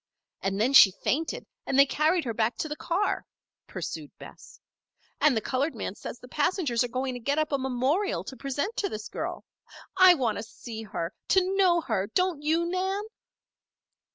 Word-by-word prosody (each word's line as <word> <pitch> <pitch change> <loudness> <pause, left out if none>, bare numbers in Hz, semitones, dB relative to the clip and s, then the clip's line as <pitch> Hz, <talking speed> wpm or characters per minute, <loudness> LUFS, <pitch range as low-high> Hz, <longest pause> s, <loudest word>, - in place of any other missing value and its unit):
And 195 +1 -1
then 245 +6 +2
she 210 - +10
fainted 290 - -2 0.2
and 270 - 0
they 275 - +8
carried 315 +5 +1
her 230 - -2
back 225 +2 0
to - - -2
the 300 - -4
car," 355 +6 -1 0.4
pursued - - -6
Bess. - - -13 0.6
"And 290 -6 +4
the - - 0
colored 275 +7 -1
man - - -4
says - - -8
the - - -14
passengers 280 - +1
are - - -1
going 255 +2 -2
to 245 - -6
get 280 +5 -1
up 310 -1 0
a 280 - +1
memorial 265 +10 0
to 265 - -8
present 280 - -3
to 400 - 0
this 215 -7 -6
girl. - - -5 0.5
I 370 -1 +8
want 235 -8 -1
to - - -5
see 225 0 -9
her 180 -5 -4
to 380 0 +2
know 360 -3 +4
her. 195 -10 -1
Don't 360 - 0
you, 320 +3 +1
Nan?" 380 +3 -1
280 Hz, 185 wpm, -27 LUFS, 240-355 Hz, 0.6 s, she